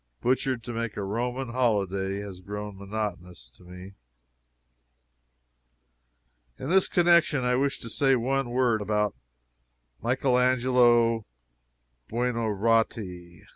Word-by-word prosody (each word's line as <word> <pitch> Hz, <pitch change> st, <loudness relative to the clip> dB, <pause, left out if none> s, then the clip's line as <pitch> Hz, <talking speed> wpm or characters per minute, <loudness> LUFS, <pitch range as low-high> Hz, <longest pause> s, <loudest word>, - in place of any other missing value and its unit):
"Butchered 130 Hz, -1 st, 0 dB
to 120 Hz, -, -6 dB
make 115 Hz, -1 st, -4 dB
a 100 Hz, -, -2 dB
Roman 120 Hz, +5 st, -3 dB
holyday" 100 Hz, -5 st, 0 dB
has 100 Hz, -3 st, -8 dB
grown 105 Hz, +2 st, -7 dB
monotonous 95 Hz, -, -6 dB
to 90 Hz, -, -21 dB
me. 90 Hz, +2 st, -11 dB, 2.6 s
In 130 Hz, -, -6 dB
this 190 Hz, 0 st, +4 dB
connection 170 Hz, -6 st, +3 dB
I 125 Hz, 0 st, +1 dB
wish 140 Hz, +2 st, 0 dB
to 115 Hz, -, -7 dB
say 135 Hz, +3 st, +2 dB
one 130 Hz, +1 st, -1 dB
word 120 Hz, -3 st, +1 dB
about 105 Hz, 0 st, 0 dB, 0.9 s
Michael 125 Hz, +1 st, +1 dB
Angelo 120 Hz, -3 st, +3 dB, 0.8 s
Buonarotti. 110 Hz, -6 st, -1 dB
115 Hz, 105 wpm, -27 LUFS, 100-125 Hz, 2.6 s, this